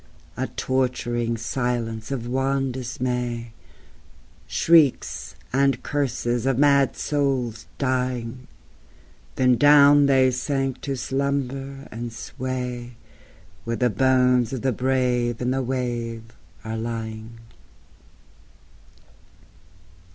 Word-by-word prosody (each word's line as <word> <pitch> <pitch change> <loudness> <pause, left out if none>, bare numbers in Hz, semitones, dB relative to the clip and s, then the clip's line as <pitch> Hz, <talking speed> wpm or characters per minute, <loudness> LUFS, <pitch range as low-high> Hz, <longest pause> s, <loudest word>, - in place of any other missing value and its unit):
A - - -2
torturing 120 -3 -1
silence 115 -1 -2
of 130 -4 -3
wan 135 +2 0
dismay 125 -2 -3 0.9
Shrieks 160 -5 +2 0.2
and 135 +1 +2
curses 120 -3 -1
of 135 -2 +2
mad 140 -1 +4
souls 130 -6 -1
dying 125 -2 -2 0.9
Then 125 -1 +3
down 145 +1 +7
they 130 -2 +4
sank 135 +1 -2
to 140 -1 -3
slumber 135 +1 -3
and 120 +1 -5
sway 125 0 -5 0.7
Where 115 0 -2
the 125 -1 +1
bones 125 +1 +3
of 130 - -4
the 135 - +2
brave 125 -1 0
in 125 0 0
the 135 +1 0
wave 120 -3 -3 0.4
are 110 0 -3
lying. 110 0 -5
125 Hz, 95 wpm, -24 LUFS, 120-135 Hz, 0.9 s, down